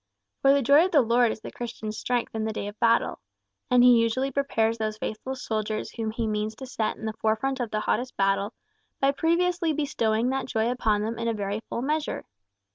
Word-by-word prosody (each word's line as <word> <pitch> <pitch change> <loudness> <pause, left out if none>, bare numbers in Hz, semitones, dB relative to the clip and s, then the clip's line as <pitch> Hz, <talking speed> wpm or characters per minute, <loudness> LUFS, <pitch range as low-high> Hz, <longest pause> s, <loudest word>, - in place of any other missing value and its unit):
For 275 - +6
the 280 0 +3
joy 285 +7 +6
of 375 - -2
the 290 - +7
Lord 235 0 +3
is 215 - -7
the - - -8
Christian's 220 -3 -6
strength 245 +1 -2
in 220 -1 -2
the 220 - -1
day 210 -1 -4
of 205 +1 -9
battle. 230 0 +2 0.5
And 250 -1 +5
he 245 -2 +7
usually 255 +4 0
prepares 230 -5 0
those 215 -1 -2
faithful 220 +5 -4
soldiers 215 -3 -3
whom 225 -2 -3
he 225 +1 -2
means 215 0 -2
to 265 - -8
set 230 -4 -2
in - - -7
the 220 - -2
forefront 220 +5 -1
of 240 -3 -2
the 215 0 -1
hottest 250 +4 -1
battle, 195 +2 +1 0.5
by 275 0 +3
previously 340 +2 +1
bestowing 245 -6 0
that 265 0 -2
joy 225 -1 0
upon 215 -4 +1
them 225 +2 -3
in 230 -1 -1
very 200 +1 -2
full 235 - -3
measure. 305 +2 -2
230 Hz, 210 wpm, -26 LUFS, 220-265 Hz, 0.5 s, the